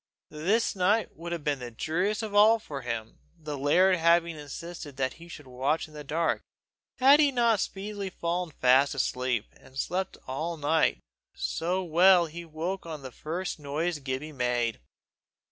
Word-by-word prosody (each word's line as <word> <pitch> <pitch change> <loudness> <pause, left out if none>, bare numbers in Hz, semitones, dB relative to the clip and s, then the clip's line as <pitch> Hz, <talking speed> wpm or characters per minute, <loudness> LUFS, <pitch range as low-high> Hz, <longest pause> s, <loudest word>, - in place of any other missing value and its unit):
This 195 +10 +1
night 200 +4 +1
would 170 +1 -7
have 170 -3 -3
been 145 -2 0
the 125 -1 -6
dreariest 180 - -1
of 215 -2 -5
all 215 +2 +7
for 145 -10 -7
him, 115 -2 -5 0.2
the 150 -2 -6
laird 180 +7 +4
having 170 0 +3
insisted 150 0 -8
that 130 -1 0
he 170 - -11
should 150 -4 -10
watch 130 +6 -1
in 155 - -18
the 150 -1 -8
dark, 160 +3 0 0.6
had 275 +3 +7
he 290 -2 +5
not 235 -4 +3
speedily 200 0 -4
fallen 175 0 -2
fast 135 0 +3
asleep, 125 -4 0
and 135 0 -16
slept 185 +6 -2
all 160 +6 -3
night 155 +2 +2 0.4
so 180 +3 -1
well 175 +1 +5
that 160 - -10
he 170 +1 -7
woke 170 +4 -4
at 155 -4 -7
the 130 - -7
first 170 +6 -4
noise 150 +3 -2
Gibbie 135 +3 -4
made. 120 -3 0
160 Hz, 170 wpm, -28 LUFS, 140-185 Hz, 0.6 s, all